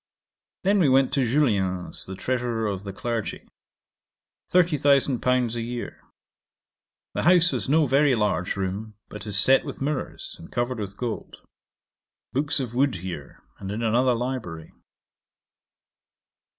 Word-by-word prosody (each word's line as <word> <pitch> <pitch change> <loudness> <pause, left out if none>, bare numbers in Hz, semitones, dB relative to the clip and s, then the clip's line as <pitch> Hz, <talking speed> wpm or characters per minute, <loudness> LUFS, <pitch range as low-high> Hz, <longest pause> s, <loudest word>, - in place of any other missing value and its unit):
'Then 200 +2 +3
we 160 -7 +4
went 130 0 +4
to 135 - +2
Julien's, 100 -9 0
the 95 - -6
Treasurer 120 0 -1
of 100 -2 -2
the 100 - -4
Clergy: 115 +2 -4 1.0
30,000£ 135 -7 +3
a 120 - -2
year. 120 +1 -5 1.1
The - - -1
house 175 0 +5
has - - -1
no 155 +2 +4
very 140 0 +3
large 100 -5 0
room, 100 +3 -4
but 105 +1 -8
is 100 -1 0
set 130 +7 +5
with - - -7
mirrours, 145 0 -3
and 85 - -12
covered 120 0 -1
with 100 -1 -5
gold. 120 -3 -5 0.9
Books 145 +3 +1
of 125 -4 -4
wood 130 0 +2
here, 85 -5 -7 0.2
and 95 - -6
in 105 +3 -3
another 120 +3 +3
library. 115 -10 -4
120 Hz, 135 wpm, -25 LUFS, 100-135 Hz, 1.1 s, house